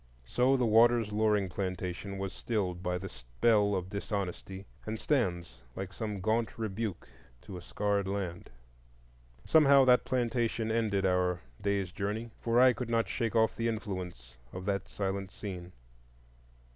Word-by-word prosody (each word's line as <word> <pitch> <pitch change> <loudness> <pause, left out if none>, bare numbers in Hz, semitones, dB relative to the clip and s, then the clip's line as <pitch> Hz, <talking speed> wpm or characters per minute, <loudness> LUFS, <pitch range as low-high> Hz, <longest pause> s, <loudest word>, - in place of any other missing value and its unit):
So 125 - +3
the 125 - +2
Waters 115 0 +4
Loring 105 -2 +2
plantation 95 +1 -4
was 95 -1 -4
stilled 95 -6 -2
by 90 -1 -1
the 95 +2 -6
spell 100 - +1
of 95 0 -3
dishonesty, 100 -1 -4 0.2
and 110 0 -4
stands 90 - -1
like 95 0 -5
some 105 -3 -4
gaunt 110 +3 0
rebuke 110 -2 -3 0.4
to 95 - -9
a 90 - -7
scarred 100 +1 -1
land. 95 -3 -4 1.0
Somehow 140 -4 +6
that 125 -1 +5
plantation 120 -3 0
ended 105 -4 +1
our 90 -1 +1 0.2
day's 100 -2 0
journey; 105 +4 -3
for 115 +1 +2
I 130 0 +7
could 125 -1 -5
not 115 -1 +1
shake 115 -2 -1
off 110 0 +3
the 115 - -1
influence 95 - -5 0.2
of 90 0 -7
that 100 -1 -1
silent 95 -1 -3
scene. 90 -4 -7
100 Hz, 145 wpm, -31 LUFS, 95-115 Hz, 1.0 s, I